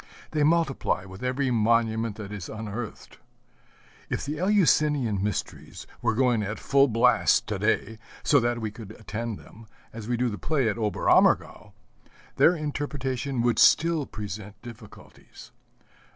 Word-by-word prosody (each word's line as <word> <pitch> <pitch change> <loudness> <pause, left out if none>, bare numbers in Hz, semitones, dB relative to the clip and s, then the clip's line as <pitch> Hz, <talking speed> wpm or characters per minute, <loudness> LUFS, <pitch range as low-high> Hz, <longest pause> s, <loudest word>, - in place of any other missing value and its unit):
They 155 - -1
multiply 150 - +1
with 95 +1 -11
every 130 +1 0
monument 115 -1 +1
that 105 -2 -8
is 100 -5 -7
unearthed. 110 +1 -7 0.9
If - - -3
the 150 +1 -4
Eleusinian 150 - +2
mysteries 105 -1 -5 0.2
were 110 - 0
going 125 -2 +2
at 105 +1 -4
full 140 0 +3
blast 115 -2 +3
to - - -2
day, 110 +1 -1 0.2
so 145 - +4
that 120 0 0
we 110 -2 -4
could 110 -1 -10
attend 110 +1 -5
them, 110 +1 -16 0.3
as 110 -1 -8
we 120 0 -1
do 125 +1 +1
the 105 -5 -4
play 140 - 0
at 110 +2 -3
Oberammergau, 105 -2 +2 0.6
their 175 - +5
interpretation 140 -4 -3
would 120 -1 +1
still 165 -3 +4
present 105 0 -8
difficulties. 115 -3 -14
115 Hz, 140 wpm, -26 LUFS, 105-140 Hz, 0.9 s, their